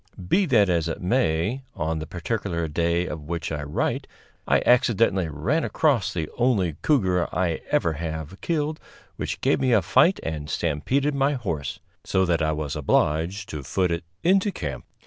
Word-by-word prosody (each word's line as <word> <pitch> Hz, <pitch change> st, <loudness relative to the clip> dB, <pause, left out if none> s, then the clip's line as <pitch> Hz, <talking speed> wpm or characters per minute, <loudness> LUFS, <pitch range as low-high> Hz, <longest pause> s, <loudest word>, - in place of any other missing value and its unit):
Be 190 Hz, -, +3 dB
that 110 Hz, -8 st, +4 dB
as 85 Hz, -3 st, +1 dB
it 80 Hz, -, -3 dB
may, 100 Hz, +2 st, +1 dB
on 80 Hz, 0 st, -1 dB
the 80 Hz, -, -6 dB
particular 90 Hz, -1 st, -2 dB
day 85 Hz, +3 st, 0 dB
of 80 Hz, -3 st, -5 dB
which 85 Hz, -1 st, -3 dB
I 75 Hz, -2 st, -2 dB
write 75 Hz, +1 st, -2 dB, 0.4 s
I -, -, +3 dB
accidentally 115 Hz, -7 st, +3 dB
ran 110 Hz, -, 0 dB
across 135 Hz, -11 st, +1 dB
the 80 Hz, -4 st, -3 dB
only 100 Hz, -, +2 dB
cougar 95 Hz, -, +2 dB
I 90 Hz, -3 st, 0 dB
ever 80 Hz, -, +2 dB
have 80 Hz, +3 st, -5 dB
killed 155 Hz, -2 st, -1 dB, 0.4 s
which -, -, -4 dB
gave -, -, +2 dB
me 130 Hz, -2 st, +2 dB
a 110 Hz, -, +4 dB
fight 185 Hz, +3 st, +4 dB
and 75 Hz, -2 st, -4 dB
stampeded 130 Hz, -, 0 dB
my 140 Hz, +1 st, +2 dB
horse, 90 Hz, -, -4 dB, 0.2 s
so 95 Hz, -1 st, +1 dB
that 85 Hz, -2 st, +1 dB
I 80 Hz, 0 st, +2 dB
was 75 Hz, -3 st, -3 dB
obliged 80 Hz, +7 st, +1 dB
to 75 Hz, -, -5 dB
foot 90 Hz, +7 st, 0 dB
it 85 Hz, 0 st, -2 dB, 0.2 s
into 195 Hz, +3 st, +3 dB
camp. -, -, -5 dB
90 Hz, 170 wpm, -25 LUFS, 80-120 Hz, 0.4 s, that